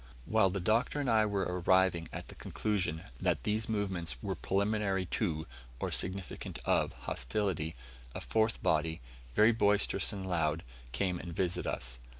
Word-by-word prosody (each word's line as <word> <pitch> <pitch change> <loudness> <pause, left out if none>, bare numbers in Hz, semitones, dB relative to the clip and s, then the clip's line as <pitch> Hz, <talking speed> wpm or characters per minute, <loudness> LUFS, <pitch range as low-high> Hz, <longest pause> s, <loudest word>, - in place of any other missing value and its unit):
While 110 -3 +4
the 95 +2 -2
Doctor 110 +10 +1
and 140 - -1
I 110 -2 +4
were 100 -2 0
arriving 90 -1 +2
at - - -6
the - - -8
conclusion 95 -7 -2 0.2
that - - +1
these 110 +5 0
movements 95 - 0
were - - -1
preliminary 100 -1 0
to 80 -5 -1 0.3
or - - -2
significant 95 0 -1
of - - +2
hostility, 80 - -1 0.4
a - - -2
fourth 110 0 +1
body, 80 +1 +1 0.4
very 110 +2 +6
boisterous 105 -3 +3
and 100 -3 -5
loud, 80 -3 0 0.3
came 90 +3 0
and 85 -1 -7
visited 90 -2 0
us. 60 0 -3
95 Hz, 155 wpm, -32 LUFS, 85-105 Hz, 0.4 s, very